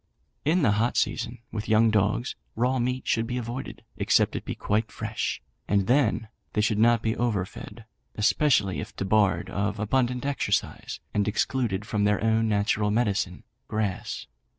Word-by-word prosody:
"In 165 +3 +3
the 110 - +4
hot 110 +4 +1
season, 120 0 -1
with 110 0 -4
young 110 +1 +5
dogs, 105 +4 +1 0.2
raw 125 +3 +1
meat 125 +2 -1
should 115 0 +1
be 125 +1 -2
avoided, 120 +2 -5
except - - +2
it - - -3
be - - -4
quite 105 +2 -1
fresh, - - -3 0.2
and 100 -2 +2
then 120 -2 +2 0.3
they 105 - +2
should 105 0 +1
not 115 0 +4
be 110 0 0
over 110 -6 0
fed, 110 +4 -11 0.3
especially 105 - +2
if - - -7
debarred 100 0 +1
of 100 +1 -1
abundant 125 +4 0
exercise, 140 -1 -1
and 105 -1 +1
excluded 105 -2 0
from 105 -1 0
their 105 0 +2
own 110 0 +2
natural 105 0 +1
medicine, 105 -5 0 0.2
grass. 105 -3 -2
110 Hz, 160 wpm, -26 LUFS, 105-120 Hz, 0.3 s, young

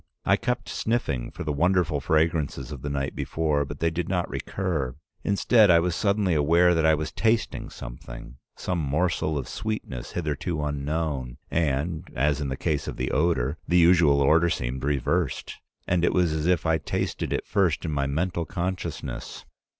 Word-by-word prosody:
I - - +5
kept - - -2
sniffing 70 - -1
for - - -7
the 75 - -2
wonderful 85 0 +2
fragrances 75 -2 0
of 70 -4 -7
the 70 - -3
night 70 -1 -2
before, 75 -3 0
but 75 +1 -7
they 85 +2 +1
did 85 0 -3
not 90 -2 0
recur. 80 -10 -2 0.3
Instead, 105 +1 +4
I 85 -1 +7
was 85 0 0
suddenly 100 -3 +1
aware 85 +4 +4
that 80 -1 +3
I 80 - +5
was 75 0 -4
tasting 115 0 0
something, - - -9 0.2
some 90 -2 -2
morsel 80 +1 0
of 70 - -4
sweetness 110 - -5
hitherto 75 -1 -2
unknown, 75 -3 -2
and, 80 +1 -1
as 75 +3 +1
in 70 - -2
the 65 - -3
case 75 -1 -1
of - - -5
the 65 - -2
odor, 70 -4 +1
the 90 - +3
usual 85 -5 +5
order 80 +5 +4
seemed 65 -3 -2
reversed, 75 +2 -1 0.3
and 90 -1 +1
it - - +3
was 90 -3 +2
as 80 +1 -1
if 90 -2 +2
I 80 -1 +2
tasted - - -2
it - - -1
first 90 -7 +1
in 80 - -2
my 70 -2 0
mental 85 +4 -1
consciousness. 90 -2 -4
80 Hz, 175 wpm, -26 LUFS, 70-90 Hz, 0.3 s, I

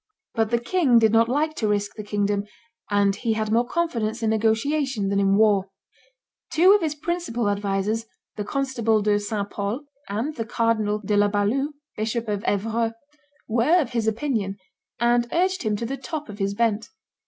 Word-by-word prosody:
But 225 -1 +1
the 235 - +2
king 255 0 +3
did 220 -2 +5
not 230 +1 +4
like 305 +4 +1
to 220 - 0
risk 205 0 -1
the 215 - -6
kingdom; 205 0 -1 0.4
and 200 -1 +2
he 225 +1 -1
had 215 -1 -2
more 235 +2 +2
confidence 235 -9 -1
in 220 - +2
negotiation 225 +1 +1
than 200 0 +1
in 195 0 +3
war. 200 -2 +3 0.8
Two 360 +5 +6
of 415 - +3
his 310 -2 -1
principal 300 -8 -2
advisers, 205 +2 -1 0.3
the 210 - -3
constable 230 -4 0
De 205 0 +3
St. 205 -1 -3
Pol 205 +6 -3 0.3
and 235 +10 -2
the 225 - -2
cardinal 225 -2 +1
De 210 - +1
la 205 0 +4
Balue, 215 +9 0 0.2
Bishop 225 +2 -2
of 205 -1 -2
Evreux, 225 +3 0 0.5
were 245 +10 +3
of 280 -8 -1
his 230 -2 -1
opinion, 220 -4 -1 0.4
and 240 0 +2
urged 370 +2 +1
him 215 -3 0
to 230 - -3
the 270 +4 -3
top 300 +1 -6
of 210 0 -9
his 200 0 -1
bent. 225 -1 0
225 Hz, 180 wpm, -24 LUFS, 205-250 Hz, 0.8 s, Two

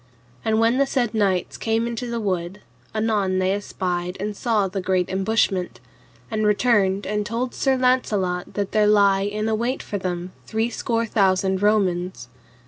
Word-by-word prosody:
And 220 0 +1
when 230 +3 +3
the 275 - +3
said 245 -5 0
knights 195 -5 0
came 225 +1 0
into 235 +1 -4
the 235 0 -2
wood, 190 -2 -3 0.3
anon 215 -4 0
they 185 0 +1
espied 180 -3 -3
and 205 +1 -3
saw 215 -3 +1
the 190 +1 -4
great 185 -1 0
embushment, 190 -1 0 0.5
and 215 -1 -1
returned 205 -3 +2
and 210 +1 -1
told 235 +4 -3
Sir 270 -1 +1
Launcelot 210 -8 0
that 200 -1 -2
there 215 -1 +3
lay 200 -1 +4
in 215 +1 -2
await 235 +4 -1
for 205 - -4
them 180 -1 -4 0.2
three 225 +2 -1
score 230 0 -1
thousand 190 -3 +1
Romans. 185 - +1
205 Hz, 160 wpm, -23 LUFS, 190-225 Hz, 0.5 s, lay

